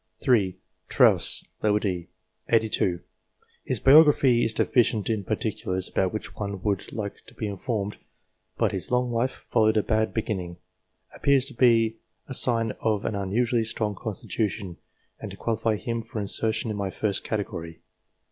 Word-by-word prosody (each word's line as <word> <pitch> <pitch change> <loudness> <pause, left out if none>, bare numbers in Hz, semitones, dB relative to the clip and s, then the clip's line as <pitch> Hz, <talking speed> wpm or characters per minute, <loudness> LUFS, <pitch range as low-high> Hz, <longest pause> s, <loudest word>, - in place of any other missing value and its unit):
3. 100 -9 +2 0.3
Trosse, - - +4 0.2
d. 100 -5 0 0.4
set. - - +4
82. 105 -6 +1 0.6
His - - -1
biography 135 -4 +6
is 115 - +1
deficient 115 -2 +1
in 105 -3 -1
particulars 95 0 -2
about 95 -1 0
which 110 - -6
one 100 -2 -4
would 100 -3 -1
like 105 -2 -6
to - - -16
be 110 - -4
informed, 105 0 -3 0.6
but - - +1
his - - -3
long 125 0 +1
life, 120 +3 -2
following 110 -1 +3
a 105 - +3
bad 110 0 +1
beginning, 95 -6 -3 0.6
appears 140 -2 +2
to 135 - -7
be 115 -2 +3 0.3
a 130 - -6
sign 115 -3 +4
of 110 -3 0
an - - -1
unusually 115 +4 0
strong 110 -1 -2
constitution, 100 -2 -3 0.4
and - - -6
to - - -10
qualify 110 -1 0
him 115 +2 -3
for 115 0 -7
insertion 110 +2 -1
in 105 - -4
my 100 -1 -2
first 100 +1 -2
category. 85 -6 -5
110 Hz, 155 wpm, -26 LUFS, 100-115 Hz, 0.6 s, biography